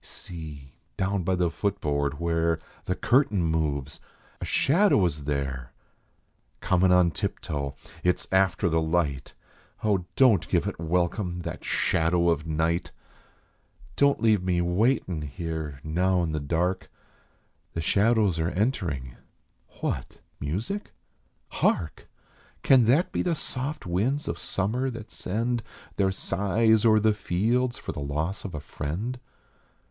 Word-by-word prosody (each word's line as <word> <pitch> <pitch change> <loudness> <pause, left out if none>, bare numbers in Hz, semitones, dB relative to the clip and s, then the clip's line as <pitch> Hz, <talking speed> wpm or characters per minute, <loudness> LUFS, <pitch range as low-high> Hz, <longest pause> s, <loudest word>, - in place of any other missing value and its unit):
See, 75 -6 -9 0.2
down 100 +1 0
by 95 +2 +1
the 90 -2 +1
foot 100 +1 -1
board, 70 -1 -1
where 85 -1 +1 0.3
The 90 - -1
curtain 120 -8 +2
moves! 75 -3 -1 0.4
A - - -2
shadow 165 - +3
is 75 -4 -2
there, 70 -4 -3 0.9
Comin 90 0 +3
on 90 -2 +5
tiptoe! 70 -3 -3 0.3
It 90 0 +3
s - - -10
after 95 -1 +3
the 80 -1 +2
light. 80 -5 -1 0.5
Oh, 100 -5 +1
don 125 -7 +6
t - - -12
give - - +2
it - - -4
welcome, 90 +2 -1
that - - -6
shadow 85 +1 +2
of 80 -1 0
night 80 +2 0 0.5
!" - - -28
"Don 140 0 +4
t - - -19
leave 110 -4 +4
me 90 -1 +1
waitin 90 - +1
here 75 -1 -5
now 90 +3 +1
in 80 - -1
the 75 - -1
dark, 85 +6 -1 0.8
The - - -3
shadows 105 -1 +3
are 80 +1 +1
entering. 85 - -2 0.6
What - - -3 0.2
music? 105 - -3 0.6
Hark? 75 -6 -1 0.5
Can 130 -4 +6
that 135 +10 +3
be - - 0
the 175 -2 +1
soft 140 0 -4
winds 110 - 0
of - - -3
summer 115 +7 -1
that 115 -3 -8
send 115 +5 -1 0.4
Their 95 -1 +3
sighs 110 +3 +2
o 110 - +6
er 110 - +5
the 110 0 +3
fields 115 +6 0
for - - -5
the - - -6
loss 75 +7 -2
of 95 -6 -6
a - - -3
friend 90 - -4
90 Hz, 145 wpm, -27 LUFS, 80-110 Hz, 0.9 s, don